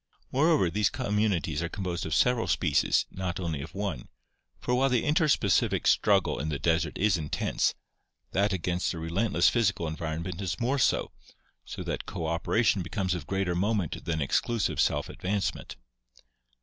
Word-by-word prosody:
Moreover, 140 - +3
these 105 +1 +2
communities 105 - 0
are 85 - -2
composed 90 -4 -3
of 80 - -1
several 125 -2 +2
species, 75 -4 +2
not 90 -2 -4
only 80 -5 -3
of 80 - -9
one, 95 -10 -3 0.5
for 125 - -2
while 135 +2 +3
the 125 -2 +1
inter 155 +2 +3
specific 100 - +2
struggle - - +3
in 75 +3 -2
the 75 - -2
desert 80 +3 0
is 100 -3 +2
intense, 75 -2 -1 0.6
that 100 +2 +1
against 90 -1 -1
a - - -6
relentless 85 +3 +1
physical 100 -7 +1
environment 85 +3 -4
is 90 -4 -3
more 130 +4 0
so, - - +2 0.5
so - - -6
that - - -4
cooperation 90 +5 0
becomes 95 +1 -2
of 85 -4 -5
greater 95 -2 0
moment 100 -1 -1
than 80 -3 -1
exclusive 115 - 0
self - - +1
advancement. 100 +2 -3
95 Hz, 155 wpm, -28 LUFS, 85-105 Hz, 0.6 s, Moreover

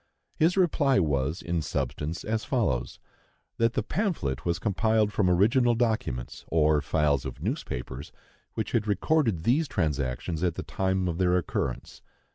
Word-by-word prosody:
His 170 +4 +2
reply 145 -7 +3
was, 75 0 0
in 85 -1 -1
substance, 75 +3 -3
as 110 0 -1
follows: 115 - -1 0.6
That 115 0 +2
the - - 0
pamphlet 145 - -2
was 85 -1 +1
compiled 110 0 +1
from 95 -3 +2
original 115 +7 +4
documents, 110 - -2
or 75 -2 +3
files 75 -2 +1
of - - -7
newspapers, 65 +2 -4 0.4
which - - -3
had 110 -2 0
recorded 105 - +1
these 140 - +2
transactions 75 - -2
at 90 -3 0
the - - -4
time 95 -1 -1
of 85 0 -2
their 90 -1 +3
occurrence. 85 - -3
90 Hz, 145 wpm, -27 LUFS, 75-115 Hz, 0.6 s, original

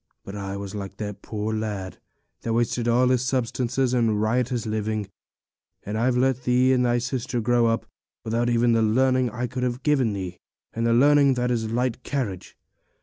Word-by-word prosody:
But 100 - -7
I 100 -1 -4
was 100 0 -6
like 100 -2 -6
that 105 -2 -6
poor 110 0 -3
lad 105 -4 -4 0.4
that 115 - -2
wasted 120 0 0
all 125 +2 +3
his 130 -1 +2
substance 125 -1 -1
in 120 -5 +2
riotous 120 +2 0
living; 110 -2 -2 0.7
and 105 - -5
I've 120 +3 +1
let 130 0 +2
thee 125 +1 +3
and 125 -1 +2
thy 120 -1 +2
sister 125 0 -2
grow 120 +1 +2
up 115 0 0 0.4
without 115 +1 0
even 120 0 +3
the 115 -1 +3
learning 130 +3 +2
I 120 +3 -3
could 125 +1 -5
have 125 +1 -2
given 135 -7 +2
thee; 95 -3 -5 0.3
and 115 +1 -1
learning 140 -1 +5
is 120 -2 0
light 125 +1 -1
carriage. 120 -10 -4
120 Hz, 175 wpm, -24 LUFS, 110-125 Hz, 0.7 s, learning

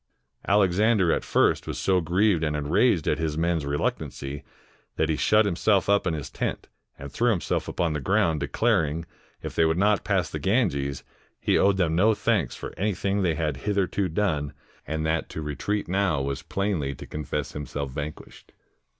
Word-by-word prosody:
Alexander 100 -1 +3
at - - 0
first - - +2
was - - -4
so 95 -1 +2
grieved 90 +1 +2
and 75 -1 0
enraged 80 - +2
at - - +1
his 80 -2 -2
men's 80 -3 0
reluctancy, 70 -1 -3 0.5
that 80 - 0
he 80 - +2
shut 110 +7 +3
himself 100 +1 +2
up 100 -1 +3
in 80 - 0
his 75 -4 -6
tent, - - -3 0.3
and 70 0 -8
threw 120 - +1
himself 100 -7 -1
upon 85 -3 -1
the 75 - -2
ground, 90 -1 +1
declaring, 80 - 0 0.4
if - - -5
they - - +3
would 80 +1 +2
not 105 +2 +2
pass 95 -5 +1
the 75 - -5
Ganges, 70 - 0 0.4
he - - +1
owed 100 -1 +4
them 85 -4 +1
no 105 +5 +4
thanks 100 - 0
for - - -7
anything 100 0 0
they 85 -4 +1
had 75 -4 -1
hitherto 100 +2 0
done, 80 -6 -1 0.3
and 80 0 -2
that 80 +1 -1
to - - -6
retreat 80 +8 -2
now 95 -4 +1
was 70 0 -3
plainly 85 -7 -2
to - - -10
confess 75 -3 -4
himself 70 -1 -5
vanquished. 75 +2 -8
85 Hz, 175 wpm, -26 LUFS, 75-100 Hz, 0.5 s, owed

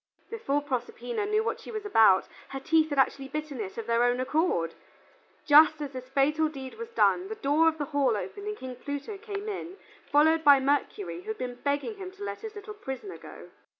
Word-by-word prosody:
Before 290 -11 -1
Proserpina 420 - -3
knew 425 +1 +2
what - - -2
she - - -11
was 430 -2 -5
about, 220 - +5 0.2
her 270 - -5
teeth 315 +3 +2
had 285 - -3
actually 270 0 +2
bitten 300 -4 -5
it 195 -2 -6
of 230 - -4
their 235 +1 +2
own 245 +1 +2
accord. 255 - 0 0.7
Just 305 +1 +7
as 290 -2 -4
this 255 0 -8
fatal 300 +3 +2
deed 265 -3 -8
was 460 0 -6
done, 385 -5 +2
the 440 - -5
door 310 -2 +3
of 320 -1 +2
the 295 - -2
hall 275 -6 +1
opened 405 - -6
and 425 0 -3
King 255 -1 -7
Pluto 285 - -6
came 410 -1 -6
in, 385 -2 -5 0.3
followed 315 +3 +4
by 285 -2 +8
Mercury, 290 +8 -1
who 395 - -19
had 440 0 -3
been 250 -1 -4
begging 285 +9 -1
him 380 -2 -6
to 400 +1 -10
let - - -5
his 440 -1 -7
little 415 +1 -8
prisoner 390 0 -7
go. - - -12
305 Hz, 215 wpm, -28 LUFS, 270-405 Hz, 0.7 s, by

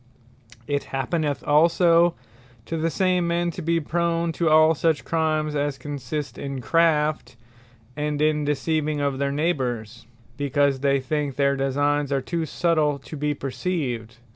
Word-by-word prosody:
It 145 -1 -2
happeneth 145 +2 -2
also 170 +2 +4 0.5
to 165 - -4
the 165 +1 0
same 180 0 +1
men, 170 0 0
to 180 - -7
be 165 +1 +1
prone 170 +1 0
to 165 0 0
all 155 +1 +6
such 160 -1 0
Crimes, 155 -2 0
as 145 -1 -1
consist 145 -2 -5
in 140 -1 -4
Craft, 150 -3 +1 0.6
and 150 0 -2
in 150 0 +2
deceiving 150 +1 -1
of 140 -2 -1
their 140 0 0
Neighbours; 125 -7 -2 0.3
because 140 -1 +1
they 140 0 +2
think 145 0 -2
their 140 -1 +2
designes 145 +1 0
are 140 - +2
too 165 +4 -3
subtile 155 -4 +1
to 140 +3 -10
be 150 0 -1
perceived. 130 - -3
150 Hz, 145 wpm, -24 LUFS, 140-165 Hz, 0.6 s, all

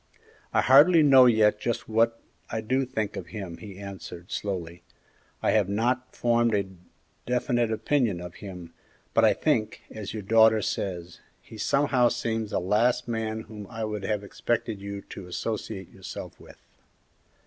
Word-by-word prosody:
"I - - +3
hardly 155 +5 +7
know 135 -3 +8
yet 105 -2 +4
just 120 +1 -2
what 115 +1 +2 0.3
I 110 - -2
do 130 +5 0
think 110 -5 -3
of - - -6
him," 95 -6 -7
he 100 -3 -10
answered, 95 -3 -9
slowly; 90 -4 -4 0.6
"I - - +3
have 105 -3 +2
not 125 +5 -1
formed 120 -2 +2
a 100 -1 +1 0.6
definite 120 -2 +1
opinion 115 -4 +1
of 90 0 -8
him, 90 -4 -9 0.4
but - - +4
I - - +6
think, 110 - 0
as 110 -2 -6
your 110 -1 -5
daughter 110 +1 +5
says, 90 -3 -4 0.2
he - - -14
somehow 135 -1 +3
seems 115 -2 -2
the - - 0
last 115 +7 +1
man 110 -1 -2
whom 105 -2 -10
I 115 +3 -6
would 105 -1 -3
have 105 0 -1
expected 110 0 -2
you 100 0 -6
to 95 - -10
associate 100 0 -4
yourself - - -9
with." - - -15
110 Hz, 160 wpm, -27 LUFS, 100-120 Hz, 0.6 s, know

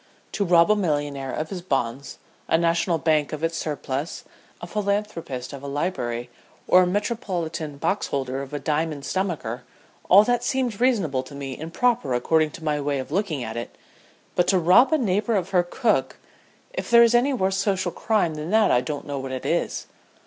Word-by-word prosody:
To 205 - -1
rob 170 0 +5
a - - +5
millionaire 145 -7 -1
of 155 +3 -4
his 185 -2 -4
bonds, 135 -5 -2 0.3
a - - +3
national 170 0 +1
bank 150 -1 +1
of 155 +1 -5
its 165 0 0
surplus, 145 -1 -4 0.4
a - - -7
philanthropist 200 -10 -3
of 140 - -7
a 140 - -7
library, 125 -6 -3 0.4
or 185 - +7
a 180 - +3
Metropolitan 180 - -3
Boxholder 140 -6 -1
of 140 0 -8
a 145 - -3
diamond 150 0 -2
stomacher, 150 - -2 0.5
all 200 +3 +8
that 245 +1 0
seemed 245 -5 -1
reasonable 195 - +2
to 130 +2 -12
me 135 -2 -5
and 160 +2 -7
proper 230 - +1
according 155 +5 +2
to 160 - -11
my 150 -2 0
way 140 0 -1
of 130 +1 -5
looking 165 - -1
at 110 -1 -6
it, 120 0 -6 0.6
but 175 - +2
to 190 - +4
rob 180 - +5
a 315 - +4
neighbor 215 -2 0
of 190 -2 -1
her 180 -2 +4
cook 175 - 0 0.6
if - - -4
there 235 0 +8
is 235 0 +4
any 245 +4 +4
worse 190 -7 0
social 190 -3 0
crime 210 -7 0
than 155 +1 -5
that 215 +1 +4
I 125 - +4
don't 145 +3 -5
know 140 -1 -4
what 135 0 -5
it 130 -1 -5
is. - - -1
165 Hz, 190 wpm, -24 LUFS, 140-200 Hz, 0.6 s, all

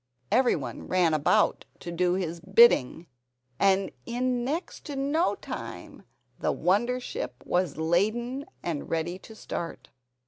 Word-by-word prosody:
Every 245 +3 +4
one - - -6
ran 180 -3 +3
about 155 -1 +2 0.2
to 170 - -6
do 180 +1 +1
his 170 -3 -3
bidding; 185 - +5 0.5
and 195 0 +3 0.2
in 245 0 0
next 305 +8 -3
to 290 - -5
no 285 +6 +1
time - - -8 0.3
the - - +1
wonder 240 +7 +1
ship 450 - -5
was 180 -4 0
laden 220 - 0 0.2
and 160 -4 -3
ready 165 +3 -2
to 220 - -13
start. 170 -5 -6
195 Hz, 135 wpm, -27 LUFS, 175-250 Hz, 0.5 s, bidding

